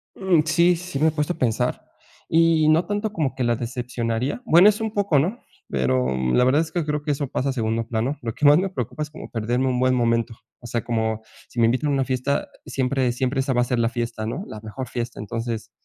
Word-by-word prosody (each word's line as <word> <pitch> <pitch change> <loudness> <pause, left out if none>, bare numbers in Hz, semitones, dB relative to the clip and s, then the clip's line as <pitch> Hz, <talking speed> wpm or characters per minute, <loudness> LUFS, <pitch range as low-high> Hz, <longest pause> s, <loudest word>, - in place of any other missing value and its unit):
Mm, 185 -5 +3
sí, 170 +2 +4
sí, 175 -4 -5
me 155 - +4
he - - +3
puesto 150 +2 -1
a - - -15
pensar. 120 -7 0 0.5
Y, 165 -1 +4
no 160 +3 +4
tanto 205 +1 -2
como 155 -8 -1
que 130 - -1
la 120 -1 +2
decepcionaría, 120 - -3
bueno, 175 +5 +7
es 210 +1 -1
un 220 -1 -2
poco, 200 -8 +2
¿no?, 190 - -1 0.3
pero 65 -1 +1 0.3
la 125 - +4
verdad 135 +5 +4
es 160 -1 -4
que 170 -2 -1
creo 150 -1 -2
que 150 - 0
eso 145 0 -2
pasa 130 +2 -1
a - - +1
segundo 115 -2 -1
plano. 115 +6 -2
Lo 115 -2 -3
que 150 - -2
más 145 +1 +8
me 190 +2 0
preocupa 150 - -4
es 150 - -7
como 155 - -10
perderme 120 +3 -1
un 125 -1 0
buen 130 0 +3
momento. 115 -1 +1 0.3
O - - -13
sea, 120 0 -2
como 110 -2 -1 0.3
si 120 - -6
me 115 - +5
invitan 130 +6 +1
a - - +1
una 135 -1 +1
fiesta 130 +2 -1 0.2
siempre 130 -1 0
siempre 130 +2 0
esa 135 0 -1
va 125 - +1
a - - +4
ser 125 0 -1
la 115 -1 +2
fiesta, 115 -2 -3
¿no?, 120 - -4
la 105 - -8
mejor 115 +4 -6
fiesta, 120 0 -5
entonces, 115 +1 -4
130 Hz, 245 wpm, -23 LUFS, 115-155 Hz, 0.5 s, más